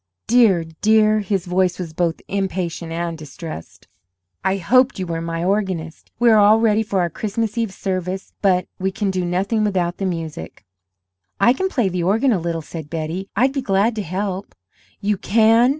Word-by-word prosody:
"Dear, 225 Hz, -8 st, +4 dB
dear!" 215 Hz, +6 st, +3 dB
His 195 Hz, -3 st, -1 dB
voice 180 Hz, 0 st, +1 dB
was 170 Hz, -4 st, -6 dB
both 170 Hz, 0 st, -1 dB
impatient 185 Hz, -4 st, -3 dB
and 170 Hz, 0 st, -2 dB
distressed. 155 Hz, -, -9 dB, 0.6 s
"I 190 Hz, -, +2 dB
hoped 255 Hz, +7 st, +3 dB
you 185 Hz, -, -3 dB
were 165 Hz, -1 st, -3 dB
my 165 Hz, 0 st, -3 dB
organist. 185 Hz, -4 st, -2 dB
We 240 Hz, 0 st, +5 dB
are 215 Hz, -, +6 dB
all 210 Hz, +2 st, +6 dB
ready 220 Hz, -1 st, +3 dB
for 200 Hz, -3 st, 0 dB
our 175 Hz, -, 0 dB
Christmas 220 Hz, +1 st, -2 dB
eve 230 Hz, -4 st, -1 dB
service, 185 Hz, 0 st, -4 dB
but 185 Hz, -2 st, +3 dB
we 190 Hz, +1 st, 0 dB
can 200 Hz, 0 st, -1 dB
do 185 Hz, -1 st, -1 dB
nothing 195 Hz, +5 st, 0 dB
without 180 Hz, -4 st, 0 dB
the 195 Hz, -, -1 dB
music." 160 Hz, -, -6 dB, 0.7 s
"I 235 Hz, +5 st, +5 dB
can 380 Hz, +8 st, -1 dB
play 245 Hz, -, +1 dB
the 180 Hz, -1 st, -2 dB
organ 220 Hz, +9 st, +2 dB
a 195 Hz, -, +1 dB
little," 165 Hz, -1 st, -3 dB
said 155 Hz, -1 st, -8 dB
Betty. 165 Hz, +4 st, -4 dB
"I'd 260 Hz, +6 st, +3 dB
be 275 Hz, -, -1 dB
glad 210 Hz, 0 st, +1 dB
to 215 Hz, -, -2 dB
help." 190 Hz, +2 st, -4 dB, 0.5 s
"You 205 Hz, 0 st, +1 dB
can? 225 Hz, +5 st, +4 dB
190 Hz, 180 wpm, -21 LUFS, 170-215 Hz, 0.7 s, are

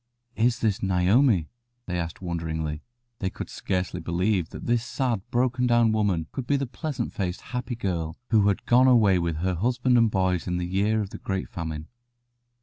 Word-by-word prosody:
"Is 115 Hz, +1 st, +1 dB
this 105 Hz, -4 st, +1 dB
Naomi?" 95 Hz, -, +3 dB, 0.4 s
they 90 Hz, -1 st, -2 dB
asked 85 Hz, +2 st, -5 dB
wonderingly. 80 Hz, -3 st, -3 dB, 0.4 s
They 95 Hz, -, -1 dB
could -, -, -7 dB
scarcely 90 Hz, -2 st, -2 dB
believe 90 Hz, +1 st, 0 dB
that -, -, -8 dB
this 120 Hz, -1 st, +1 dB
sad, 120 Hz, -4 st, -1 dB
broken 125 Hz, 0 st, +1 dB
down 120 Hz, -2 st, +4 dB
woman 100 Hz, -7 st, +1 dB
could 130 Hz, -, -5 dB
be 145 Hz, -, +3 dB
the 140 Hz, 0 st, 0 dB
pleasant 135 Hz, +3 st, -4 dB
faced, 90 Hz, -2 st, -3 dB
happy 125 Hz, 0 st, -4 dB
girl 85 Hz, -7 st, -3 dB
who 105 Hz, -3 st, +5 dB
had 100 Hz, -, 0 dB
gone 125 Hz, +2 st, +5 dB
away 105 Hz, -7 st, +5 dB
with 85 Hz, -1 st, -1 dB
her 90 Hz, +4 st, -1 dB
husband 120 Hz, +6 st, +2 dB
and 115 Hz, -1 st, +4 dB
boys 95 Hz, -3 st, 0 dB
in 90 Hz, 0 st, -1 dB
the 90 Hz, -, -2 dB
year 100 Hz, +4 st, +1 dB
of 100 Hz, -1 st, -5 dB
the -, -, -8 dB
great 95 Hz, -1 st, -3 dB
famine. 80 Hz, -2 st, -5 dB
100 Hz, 185 wpm, -26 LUFS, 90-120 Hz, 0.4 s, who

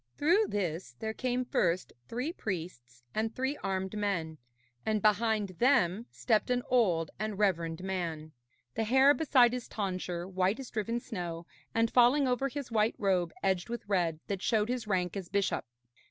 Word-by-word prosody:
Through 365 Hz, +8 st, +3 dB
this 180 Hz, -4 st, -3 dB
there 220 Hz, -1 st, -3 dB
came 250 Hz, +1 st, -1 dB
first 180 Hz, -6 st, 0 dB
three 255 Hz, +8 st, -3 dB
priests 160 Hz, -, -6 dB
and 220 Hz, +1 st, -1 dB
three 265 Hz, +3 st, -1 dB
armed 190 Hz, 0 st, -3 dB
men, 175 Hz, -7 st, -2 dB, 0.4 s
and 215 Hz, -1 st, +1 dB
behind 215 Hz, 0 st, +2 dB
them 230 Hz, -4 st, +3 dB
stepped 220 Hz, -2 st, 0 dB
an 245 Hz, 0 st, +1 dB
old 180 Hz, -11 st, +2 dB
and 215 Hz, -1 st, -3 dB
reverend 170 Hz, -4 st, 0 dB
man, 170 Hz, -5 st, -3 dB, 0.4 s
the 225 Hz, -, -1 dB
hair 265 Hz, +5 st, +6 dB
beside 260 Hz, -6 st, +4 dB
his 250 Hz, -2 st, -4 dB
tonsure 185 Hz, -3 st, -3 dB
white 190 Hz, +4 st, 0 dB
as 265 Hz, -, -8 dB
driven 230 Hz, +2 st, -1 dB
snow, 175 Hz, -7 st, -5 dB, 0.3 s
and 230 Hz, 0 st, +2 dB
falling 255 Hz, +3 st, +5 dB
over 255 Hz, +2 st, +1 dB
his 280 Hz, -2 st, -6 dB
white 220 Hz, 0 st, +2 dB
robe 185 Hz, -4 st, +1 dB
edged 190 Hz, -1 st, +1 dB
with 235 Hz, -3 st, -5 dB
red, 175 Hz, -5 st, +1 dB
that 195 Hz, -2 st, -3 dB
showed 220 Hz, -1 st, +1 dB
his 245 Hz, -3 st, -2 dB
rank 180 Hz, -3 st, 0 dB
as 190 Hz, -3 st, -5 dB
bishop. 200 Hz, -1 st, 0 dB
210 Hz, 165 wpm, -31 LUFS, 180-240 Hz, 0.4 s, hair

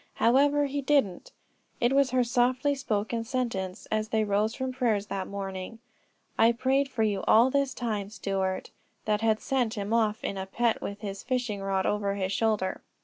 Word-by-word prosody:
However 285 Hz, +5 st, +4 dB
he 280 Hz, +1 st, -2 dB
didn't. 270 Hz, -10 st, +1 dB, 0.5 s
It 240 Hz, +2 st, +2 dB
was 275 Hz, -1 st, +4 dB
her 255 Hz, 0 st, +2 dB
softly 250 Hz, +4 st, +2 dB
spoken 230 Hz, -3 st, -2 dB
sentence 225 Hz, -7 st, -3 dB
as 215 Hz, 0 st, 0 dB
they 220 Hz, -1 st, +1 dB
rose 210 Hz, +2 st, 0 dB
from 260 Hz, -1 st, -3 dB
prayers 235 Hz, -6 st, 0 dB
that 190 Hz, -2 st, -4 dB
morning: 195 Hz, +1 st, -6 dB, 0.6 s
"I 225 Hz, +1 st, +6 dB
prayed 270 Hz, +3 st, +1 dB
for 230 Hz, -4 st, -1 dB
you 205 Hz, -3 st, 0 dB
all 235 Hz, +4 st, +6 dB
the 280 Hz, 0 st, +2 dB
time, 210 Hz, -5 st, -3 dB
Stuart," 195 Hz, -3 st, -3 dB, 0.3 s
that 210 Hz, 0 st, +1 dB
had 220 Hz, -1 st, +2 dB
sent 250 Hz, -4 st, 0 dB
him 205 Hz, +1 st, -3 dB
off 220 Hz, -2 st, +1 dB
in 195 Hz, -, -3 dB
a 190 Hz, -, -5 dB
pet 230 Hz, +3 st, 0 dB
with 200 Hz, +1 st, -6 dB
his 200 Hz, -2 st, -5 dB
fishing 245 Hz, -6 st, -2 dB
rod 195 Hz, -1 st, 0 dB
over 200 Hz, -1 st, 0 dB
his 190 Hz, -1 st, -2 dB
shoulder. 205 Hz, -2 st, 0 dB
220 Hz, 180 wpm, -28 LUFS, 200-255 Hz, 0.6 s, I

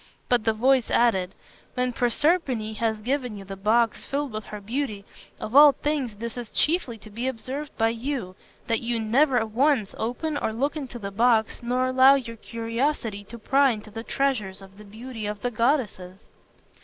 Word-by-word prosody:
But 240 Hz, -3 st, +2 dB
the 225 Hz, -, +3 dB
voice 255 Hz, +2 st, +2 dB
added, 190 Hz, -6 st, +2 dB, 0.4 s
"When 250 Hz, 0 st, 0 dB
Proserpine 245 Hz, -3 st, +1 dB
has 220 Hz, -1 st, -1 dB
given 250 Hz, -2 st, -2 dB
you 195 Hz, -, -9 dB
the 195 Hz, 0 st, -7 dB
box 220 Hz, +3 st, +1 dB
filled 285 Hz, -1 st, -3 dB
with 215 Hz, 0 st, -5 dB
her 210 Hz, -, -7 dB
beauty, 215 Hz, -1 st, -3 dB, 0.3 s
of 220 Hz, -, -6 dB
all 290 Hz, 0 st, +9 dB
things 280 Hz, -8 st, -2 dB
this 230 Hz, +3 st, -6 dB
is 235 Hz, -3 st, -8 dB
chiefly 300 Hz, -8 st, 0 dB
to 215 Hz, 0 st, -14 dB
be 235 Hz, +5 st, -3 dB
observed 265 Hz, +4 st, -5 dB
by 225 Hz, 0 st, +3 dB
you, 230 Hz, -5 st, -4 dB, 0.3 s
that 230 Hz, -1 st, +1 dB
you 235 Hz, -1 st, -2 dB
never 245 Hz, +2 st, +3 dB
once 230 Hz, -1 st, +1 dB
open 290 Hz, +7 st, -2 dB
or 220 Hz, -, -2 dB
look 275 Hz, +7 st, -1 dB
into 265 Hz, -5 st, -6 dB
the 200 Hz, -3 st, -6 dB
box 225 Hz, +1 st, +2 dB
nor 250 Hz, +2 st, 0 dB
allow 260 Hz, +1 st, +6 dB
your 230 Hz, -4 st, -4 dB
curiosity 230 Hz, -1 st, -2 dB
to 235 Hz, -, -10 dB
pry 270 Hz, +3 st, +3 dB
into 215 Hz, 0 st, -9 dB
the 225 Hz, +2 st, -6 dB
treasure 265 Hz, -7 st, 0 dB
of 195 Hz, +1 st, -11 dB
the -, -, -11 dB
beauty 220 Hz, +1 st, -7 dB
of 210 Hz, -1 st, -5 dB
the 245 Hz, -, 0 dB
goddesses." 220 Hz, -6 st, -1 dB
235 Hz, 180 wpm, -25 LUFS, 215-265 Hz, 0.4 s, all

